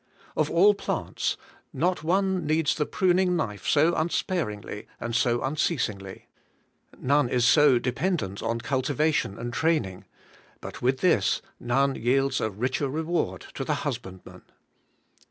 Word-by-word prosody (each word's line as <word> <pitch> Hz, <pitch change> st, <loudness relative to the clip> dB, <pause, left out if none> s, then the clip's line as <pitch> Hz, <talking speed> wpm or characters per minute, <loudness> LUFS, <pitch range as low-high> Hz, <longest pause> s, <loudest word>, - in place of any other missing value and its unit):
Of 155 Hz, -1 st, +1 dB
all 195 Hz, +5 st, +5 dB
plants, 200 Hz, -, -2 dB, 0.3 s
not 180 Hz, -2 st, 0 dB
one 190 Hz, +1 st, +1 dB
needs 155 Hz, 0 st, +2 dB
the 150 Hz, -, -2 dB
pruning 185 Hz, -1 st, +2 dB
knife 105 Hz, -, -3 dB
so 155 Hz, +3 st, +4 dB
unspar 170 Hz, -, 0 dB
ingly 105 Hz, 0 st, -8 dB
and 120 Hz, -1 st, -4 dB
so 120 Hz, -1 st, +2 dB
unceasingly. 125 Hz, -, -2 dB, 0.7 s
None 140 Hz, -1 st, +2 dB
is 125 Hz, -1 st, +2 dB
so 145 Hz, -1 st, +6 dB
dependent 125 Hz, -, -2 dB
on 115 Hz, +1 st, -2 dB
cultivation 140 Hz, -3 st, 0 dB
and 120 Hz, +1 st, -5 dB
training, 120 Hz, -, 0 dB, 0.5 s
but -, -, -9 dB
with 130 Hz, +1 st, +1 dB
this 180 Hz, -, +2 dB, 0.2 s
none 135 Hz, +3 st, +1 dB
yields 135 Hz, +3 st, +1 dB
a 110 Hz, -, 0 dB
richer 130 Hz, +7 st, -2 dB
reward 155 Hz, -, -2 dB
to -, -, -4 dB
the -, -, 0 dB
husbandman. 95 Hz, -1 st, -6 dB
135 Hz, 135 wpm, -26 LUFS, 120-165 Hz, 0.7 s, so